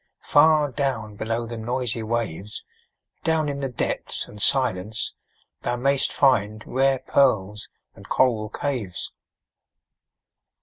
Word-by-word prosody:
far 150 -1 +5
down 115 -6 -2
below 115 +3 -2
the 115 0 -6
noisy 120 0 -1
waves, 110 -3 -3 0.6
Down 160 -2 +1
in 140 -1 -3
the 135 -1 -2
depths 125 - -2
and 105 - -10
silence 110 -6 +1 0.5
thou 120 - -1
mayst 135 +2 +2
find 110 -6 +2
Rare 135 +1 +2
pearls 105 -7 +2 0.2
and - - -15
coral 110 -5 +2
caves. 120 -9 -3
120 Hz, 115 wpm, -24 LUFS, 110-135 Hz, 0.6 s, far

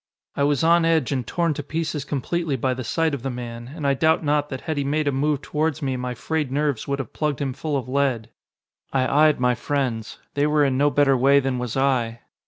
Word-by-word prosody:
I - - -2
was 145 0 +2
on 170 +1 +5
edge 160 -5 +2
and 130 -5 -2
torn 170 -2 0
to 145 - -4
pieces 155 0 -3
completely 155 +2 -2
by 130 +1 0
the 130 0 -5
sight 160 +6 0
of 140 - -3
the 135 - -3
man, 120 0 -7
and 155 -4 -5
I 140 - +3
doubt 160 +4 +2
not 145 0 +1
that 130 -2 -5
had 155 -2 -3
he 140 - 0
made 150 +2 0
a - - +3
move 145 +1 0
towards 155 0 -1
me 135 -1 -1
my 125 0 -4
frayed 150 +2 -2
nerves 145 -4 -1
would 140 0 -1
have 135 -5 -6
plugged 150 -4 -1
him 135 -2 -2
full 150 +2 -2
of 130 - -4
lead. 130 -4 0 0.6
I 140 +3 +4
eyed 150 - +1
my 125 0 +3
friends. 120 -3 -2 0.2
They 145 +1 +2
were 150 -1 +3
in 135 -2 +1
no 145 +2 +3
better 140 0 +3
way 135 +3 +5
than 130 -2 -1
was 125 0 -3
I. 120 -4 +1
140 Hz, 240 wpm, -23 LUFS, 130-150 Hz, 0.6 s, on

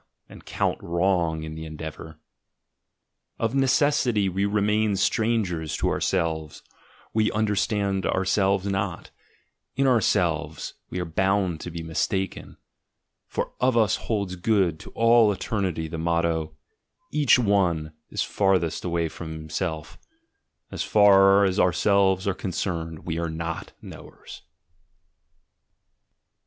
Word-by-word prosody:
— - - -55
and - - -13
count - - -1
wrong 85 -2 0
in 80 0 -6
the 80 0 -7
endeavour. 80 0 -8 1.2
Of 115 +1 -1
necessity 135 -5 +2
we 95 +2 -1
re 105 +1 +1
main 105 0 +1
strangers 95 -7 0
to - - 0
ourselves, 80 -4 -2 0.5
we 110 -1 +2
understand 105 -2 0
ourselves 95 +1 +1
not, 95 -3 -3 0.6
in 135 - +1
ourselves 120 -6 +1 0.2
we 90 - -4
are 90 - -2
bound 95 0 0
to - - -6
be 85 -1 -6
mistaken, 95 +4 -3 0.7
for - - -4
of 125 -1 +3
us 110 -3 +3
holds 100 -5 -3
good 90 -4 +1
to - - -11
all 115 -1 +5
eternity 95 -5 -2
the 80 +1 -6
motto, 80 -2 -1 0.5
"Each 145 -4 +4
one 90 -9 +1 0.2
is - - -1
the - - -15
farthest 95 -5 +1
away 85 -2 -1
from 80 0 -8
himself" 80 0 -5 0.3
— - - -48
as - - -4
far 100 -1 +5
as 95 +1 0
ourselves 95 +2 +2
are 100 - +2
concerned 85 -3 -4
we 85 -1 -2
are 85 -1 -2
not 85 +1 -5
"knowers." - - -11
95 Hz, 125 wpm, -25 LUFS, 80-105 Hz, 1.2 s, all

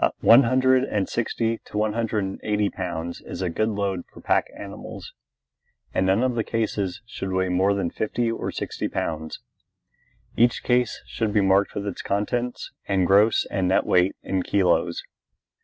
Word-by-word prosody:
One 115 +4 +8
hundred 130 +1 +3
and 100 -7 -1
sixty 115 0 -1
to - - -7
one 105 0 +1
hundred 110 -2 -1
and 95 0 -5
eighty 105 -1 0
pounds 85 -2 -5
is - - -5
a 90 - -1
good 110 +6 0
load 100 -3 -1
for - - -15
the - - -16
pack - - +2
animals, - - -9 0.8
and 95 - +1
none 95 +6 +3
of 130 -1 +1
the 115 -1 0
cases 105 -4 -2
should 95 -4 -5
weigh 95 0 0
more 95 +3 +2
than 95 -4 -1
fifty 115 +2 -1
or 115 - -3
sixty - - -3
pounds. 80 -1 -4 0.9
Each 120 +1 +3
case 125 -2 +1
should 110 -2 -2
be 105 0 +3
marked 95 +1 +2
with 100 - -3
its 100 - -4
contents 120 +5 -2 0.2
and 95 -2 +2
gross 100 +5 +4
and 95 -2 0
net 95 - +2
weight 90 +1 +3
in 95 -1 -1
kilos. 90 -2 +1
100 Hz, 175 wpm, -24 LUFS, 95-115 Hz, 0.9 s, One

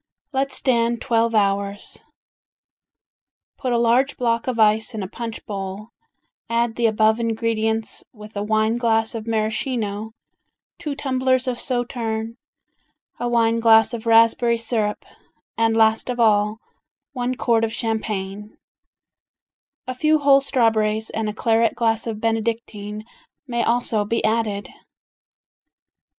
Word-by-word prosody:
Let 270 +1 0
stand 235 -3 +1
twelve 230 -2 +1
hours. 200 0 -1 1.6
Put 255 - -2
a 240 - +2
large 240 +4 +2
block 230 -1 0
of 250 -2 -1
ice 220 +2 +3
in 210 - -3
a - - -4
punch 230 +3 -7
bowl, 195 +1 -6 0.6
add 230 0 0
the 235 -1 +2
above 220 +1 +2
ingredients 225 -1 -1
with 210 -2 -13
a 200 - -2
wine 215 +2 +1
glass 225 -2 +1
of 225 -1 -6
Maraschino, 220 -1 -2 0.7
two 300 -4 -4
tumblers 260 -2 0
of 245 -1 -2
sauterne, 230 -3 -2 0.8
a 240 - -1
wine 230 -1 +2
glass 225 +1 +5
of 230 -1 -5
raspberry 230 +1 +4
syrup, 220 -2 -2 0.5
and 225 0 +1
last 220 +2 +3
of 245 -1 -3
all, 210 -1 +3 0.6
one 250 -1 -2
quart 230 -2 +1
of 225 - 0
champagne, 210 -3 -4 1.3
a 255 - -4
few 305 +4 +2
whole 280 -2 +5
straw 250 -4 +2
berries 215 0 -1
and 220 -1 -2
a - - -2
claret 225 +1 +1
glass 225 -1 0
of 220 -2 -4
Benedictine 220 -2 -3 0.4
may 235 -3 -2
also 235 -2 +1
be 230 +3 -1
added. 215 -2 0
225 Hz, 130 wpm, -22 LUFS, 215-240 Hz, 1.6 s, glass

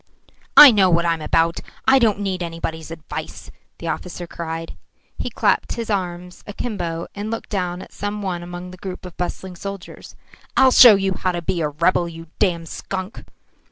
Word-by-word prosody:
"I 290 -3 +12
know 195 -4 +4
what 170 0 +2
I 170 - +3
am 165 - -6
about. 165 +2 +1 0.3
I 270 0 +6
don't 215 -4 +2
need 190 -2 -2
anybody's 165 -1 -5
advice," 165 -2 -7 0.3
the - - -7
officer 175 0 -4
cried. 165 -1 -6 0.4
He - - -2
clapped - - +1
his 230 -2 -4
arms 180 -2 -4
akimbo 175 -6 -4
and 205 +1 -5
looked 225 0 -5
down 180 -2 -2
at - - -16
some 205 0 -4
one 180 -3 -3
among 175 +1 -8
the 185 - -11
group 185 0 -7
of 180 - -10
bustling 180 +1 -4
soldiers. 195 +1 -8 0.4
"I'll 265 -1 +6
show 240 -4 +9
you 195 -1 0
how 185 -1 -1
to 175 - -3
be 180 -1 -1
a 150 - 0
rebel, 170 +3 +1
you 165 0 -10
damned 170 -5 0
skunk." 190 +1 -6
180 Hz, 185 wpm, -21 LUFS, 170-200 Hz, 0.4 s, I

